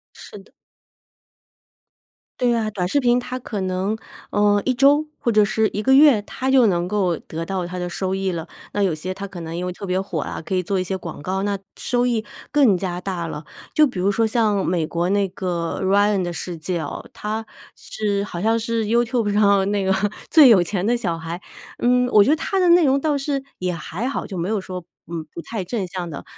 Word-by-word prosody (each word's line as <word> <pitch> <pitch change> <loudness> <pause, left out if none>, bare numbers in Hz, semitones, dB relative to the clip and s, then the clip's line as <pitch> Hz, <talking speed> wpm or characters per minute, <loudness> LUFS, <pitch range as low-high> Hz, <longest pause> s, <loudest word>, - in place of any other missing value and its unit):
是 - - -11
的。 195 - -19 1.9
对 245 -1 +2
啊， 220 -2 0
短 180 -3 -2
视 285 +8 +1
频 245 0 +3
它 250 +1 -5
可 215 -4 -5
能， 190 +3 -1 0.3
呃， 205 0 +3
1 260 - +1
周， 285 +4 +4
或 235 - -1
者 215 -2 +5
是 215 +1 +1
1 210 - -1
个 265 - +4
月， 275 -5 +7
它 255 +5 -4
就 260 -4 +5
能 175 -2 +1
够 185 -4 0
得 165 +1 -6
到 185 0 -3
它 180 - -6
的 180 0 -3
收 190 +1 -2
益 195 -1 -1
了。 165 0 -5 0.2
那 205 - -1
有 180 -5 +2
些 185 +4 -4
它 200 +1 -6
可 180 -3 -9
能 165 0 -6
因 175 +1 -3
为 180 - -3
特 200 - -8
别 185 0 0
火 190 -5 -3
啊， - - -5
可 190 +4 -3
以 185 - +1
做 190 +2 -1
一 - - 0
些 190 +1 -3
广 170 -5 -7
告， 190 +4 -2
那 200 -1 -1 0.2
收 245 0 0
益， 230 -3 0 0.2
更 270 -10 +4
加 180 -1 -3
大 175 -3 -3
了。 150 -1 -6 0.3
就 305 - +6
比 245 -9 -4
如 190 +2 +2
说 225 +3 +2
像 215 -3 +1
美 170 -3 0
国 170 +2 -1
那 200 0 +2
个 180 -3 -3
《Ryan 200 +1 +3
的 175 -1 -2
世 170 0 -5
界》 170 +2 -3
哦， - - -7
他 220 +1 -4 0.3
是 200 -2 -2
好 175 -4 -6
像 225 +2 +2
是 230 -1 -1
YouTube 235 -1 +1
上 200 -1 +4
那 205 -1 0
个， 190 0 +2 0.4
最 305 -5 +9
有 195 -7 +6
钱 190 +1 -2
的 240 +2 +2
小 180 -8 -2
孩。 165 +2 -6 0.4
嗯， 250 +1 +3
我 210 -1 +8
觉 270 - +1
得 310 - +4
他 390 - -2
的 360 -2 +4
内 340 -2 +6
容 270 +1 +3
倒 300 -2 +1
是， 275 -1 -2
也 180 -1 -2
还 170 +8 -4
好， 275 - -3
就 190 - -6
没 170 +2 -2
有 215 -1 0
说， 180 -2 -7 0.3
嗯， 165 -2 -4
不 170 - -6
太 220 +2 -5
正 200 0 -2
向 175 -1 -5
的。 145 - -7
200 Hz, 260 characters per minute, -22 LUFS, 180-230 Hz, 1.9 s, 最